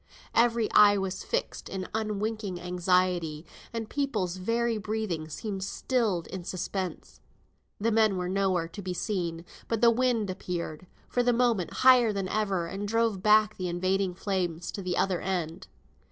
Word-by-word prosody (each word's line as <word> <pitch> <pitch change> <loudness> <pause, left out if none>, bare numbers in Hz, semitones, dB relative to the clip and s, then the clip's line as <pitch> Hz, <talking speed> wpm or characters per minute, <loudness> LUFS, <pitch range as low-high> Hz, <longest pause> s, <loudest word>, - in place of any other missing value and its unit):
Every 230 -1 +3
eye 205 -1 +7
was 190 -1 -3
fixed - - -3
in 190 -1 -4
unwinking 215 -3 -2
anxiety, 180 -3 0 0.3
and 230 -1 -4
people's 215 -11 -1
very 230 +3 0
breathing 210 -7 -3
seemed 195 +4 -4
stilled 205 -4 0
in 185 -2 -6
suspense. 185 -1 -4 0.6
The 225 +3 +1
men 215 -3 +3
were 180 0 -2
nowhere 185 -3 +1
to 200 +5 -9
be 180 -1 -4
seen, 175 -3 -2 0.2
but 230 - -1
the 235 -1 +7
wind 230 -4 +1
appeared, 180 -2 -5 0.2
for 245 - +1
the 245 0 +3
moment, 230 -7 +1
higher 250 -3 +7
than 195 -2 -2
ever, 195 -5 0
and 195 +4 -4
drove 225 -3 +1
back 215 +1 +4
the 185 - -2
invading 185 +1 0
flames 180 -4 -2
to 200 - -5
the 180 -1 -2
other 185 -3 +1
end. 180 -1 -3
195 Hz, 155 wpm, -28 LUFS, 180-220 Hz, 0.6 s, eye